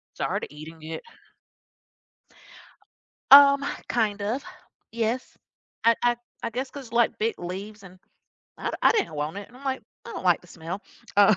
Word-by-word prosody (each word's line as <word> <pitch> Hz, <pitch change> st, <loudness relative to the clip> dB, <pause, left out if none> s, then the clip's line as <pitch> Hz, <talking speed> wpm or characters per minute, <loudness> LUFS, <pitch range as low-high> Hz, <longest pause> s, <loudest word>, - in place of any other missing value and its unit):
started -, -, -2 dB
eating 160 Hz, +2 st, -10 dB
it. 160 Hz, +1 st, -5 dB, 2.3 s
Um, 280 Hz, 0 st, +9 dB, 0.2 s
kind 210 Hz, -4 st, 0 dB
of, 235 Hz, +7 st, -2 dB, 0.5 s
yes. 230 Hz, +2 st, -2 dB, 0.5 s
I 230 Hz, 0 st, +7 dB
I 240 Hz, 0 st, +3 dB, 0.3 s
I 230 Hz, -, -2 dB
guess 255 Hz, +3 st, -3 dB
'cause, 265 Hz, -5 st, -9 dB
like, 235 Hz, -1 st, +2 dB
big 225 Hz, +1 st, 0 dB
leaves 195 Hz, +4 st, -6 dB
and 185 Hz, -1 st, -13 dB, 0.6 s
I -, -, -2 dB
I -, -, +7 dB
didn't 425 Hz, -, 0 dB
want 150 Hz, +4 st, -3 dB
it 200 Hz, -, -8 dB
and 245 Hz, -, -17 dB
I'm 275 Hz, -, -14 dB
like, 265 Hz, -1 st, -1 dB, 0.2 s
"I 235 Hz, -, -8 dB
don't -, -, -6 dB
like 175 Hz, -2 st, +4 dB
the -, -, -18 dB
smell." 170 Hz, +3 st, -7 dB, 0.3 s
Um. 205 Hz, 0 st, +7 dB
215 Hz, 160 wpm, -26 LUFS, 185-245 Hz, 2.3 s, Um